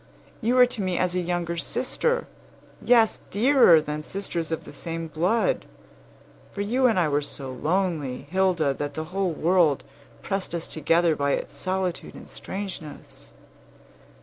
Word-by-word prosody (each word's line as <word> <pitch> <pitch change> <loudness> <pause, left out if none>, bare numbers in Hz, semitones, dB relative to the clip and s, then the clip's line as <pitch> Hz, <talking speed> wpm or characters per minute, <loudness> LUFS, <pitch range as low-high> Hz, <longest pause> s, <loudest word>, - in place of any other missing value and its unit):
You 235 +3 +1
were 250 -1 +8
to 245 -3 -5
me 185 -2 -1
as 180 -1 +1
a 180 - 0
younger 170 -1 -2
sister; 480 - 0 0.6
yes, 230 -3 +4
dearer 235 - +6
than 150 0 -4
sisters 170 -2 -4
of 160 - -2
the - - -12
same 165 -1 -4
blood; 185 - 0 0.9
for 200 - -5
you 250 +6 +2
and 225 -6 +2
I 170 - +3
were 145 0 +1
so 140 -2 -6
lonely, 155 -2 -1
Hilda, 180 -6 +2
that 145 +1 -5
the 155 - -3
whole 195 -1 +1
world 165 -3 +2 0.4
pressed 195 -3 -2
us 170 - -3
together 165 +1 +2
by 140 -1 0
its - - -4
solitude 185 -1 -2
and - - -11
strangeness. 190 -6 -8
175 Hz, 150 wpm, -25 LUFS, 155-195 Hz, 0.9 s, were